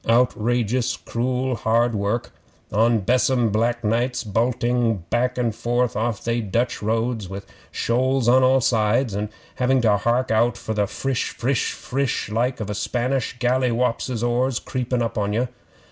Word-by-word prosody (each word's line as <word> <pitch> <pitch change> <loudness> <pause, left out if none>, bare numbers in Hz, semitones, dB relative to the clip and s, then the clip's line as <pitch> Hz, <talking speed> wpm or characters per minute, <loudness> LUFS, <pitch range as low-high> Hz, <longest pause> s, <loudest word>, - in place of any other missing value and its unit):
Outrageous 120 0 +1
cruel 125 +2 -2
hard 115 +1 +1
work 105 +3 -1 0.4
on 115 +1 +3
besom 125 +2 +2
black 120 +3 0
nights 120 +4 0
bulting 120 -1 0
back 125 +2 +1
and 120 -3 0
forth 120 +1 0
off 110 -2 -2
they 115 0 0
Dutch 115 +4 -1
roads 110 -1 -1
with 100 +1 -7 0.2
shoals 130 +1 0
on 130 +2 +6
all 130 +1 +4
sides, 115 0 +2
and 105 +1 -2 0.3
having 130 +1 +2
to 105 -3 +3
hark 120 +4 0
out 120 +2 +2
for 110 - -4
the 105 -1 +1
frish 135 +3 -2
frish 125 0 -1
frish 135 -4 -2
like 125 +4 0
of 105 -2 -4
a - - -1
Spanish 125 +4 -1
galliwopses' 125 -1 0
oars 125 +1 +1
creepin' 125 -1 -2
up 115 -1 -2
on 100 0 -1
ye. 120 +4 +1
120 Hz, 155 wpm, -22 LUFS, 110-125 Hz, 0.4 s, on